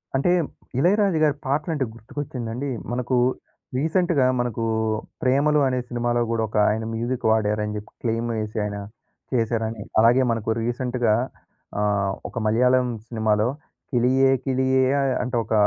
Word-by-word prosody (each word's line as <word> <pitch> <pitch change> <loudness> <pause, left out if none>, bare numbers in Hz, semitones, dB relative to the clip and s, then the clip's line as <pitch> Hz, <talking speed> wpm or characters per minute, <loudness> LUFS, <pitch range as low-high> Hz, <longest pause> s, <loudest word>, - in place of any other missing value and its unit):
అంటే 140 +7 +2 0.5
'ఇళయరాజు' 190 +2 +3
గారి 145 -2 +3
పాటలు 150 +5 0
అంటే 135 -3 0
గుర్తుకొచ్చిందండి. 125 +1 -5 0.2
మనకు 125 +1 0 0.6
రీసెంట్‌గా 160 -1 +2
మనకు 120 -2 -1 0.6
'ప్రేమలు' 145 +3 +3
అనే 130 -1 0
సినిమాలో 120 0 0
గుడా 115 -1 +1
ఒక 105 - -4
ఆయన 110 +1 -1
మ్యూజిక్ 120 +2 -2
వాడారని 105 -1 0
చెప్పి 105 +1 -9
క్లెయమెసాయినా 110 -3 -2 0.5
చేశారని. 115 -2 0 0.2
అలాగే 120 +4 +5
మనకు 115 -1 -3
రీసెంట్‌గా 120 -1 0 0.7
ఆహ్, 100 -2 +1 0.2
ఒక - - -10
మలయాళం 125 +3 +3 0.2
సినిమాలో 110 -1 +1 0.4
'కిలియే 130 +2 +3
కిలియే' 130 0 +2
ఆహ్, 135 -1 +1
అంటే 125 0 -3
ఒక, 110 - -4
120 Hz, 125 wpm, -24 LUFS, 110-130 Hz, 0.7 s, అలాగే